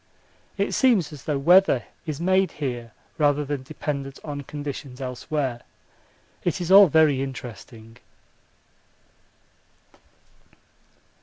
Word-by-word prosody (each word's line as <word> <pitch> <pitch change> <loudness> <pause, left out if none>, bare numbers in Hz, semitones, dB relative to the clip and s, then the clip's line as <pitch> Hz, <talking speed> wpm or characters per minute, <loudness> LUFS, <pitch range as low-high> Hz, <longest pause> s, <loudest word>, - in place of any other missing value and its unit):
It 200 +1 0
seems 210 - +2
as 140 - -11
though 150 -2 0
weather 180 +7 +4 0.2
is 155 -2 -4
made 185 +2 +2
here 120 -5 -5 0.3
rather 145 -1 +2
than 145 -1 -3
dependent 140 0 -5
on 145 -2 -5
conditions 140 -2 -7
elsewhere. 130 0 -3 0.8
It 175 +1 -1
is 175 0 -3
all 200 0 +9
very 155 -4 +3
interesting. 115 -3 -8
145 Hz, 100 wpm, -24 LUFS, 130-160 Hz, 0.8 s, all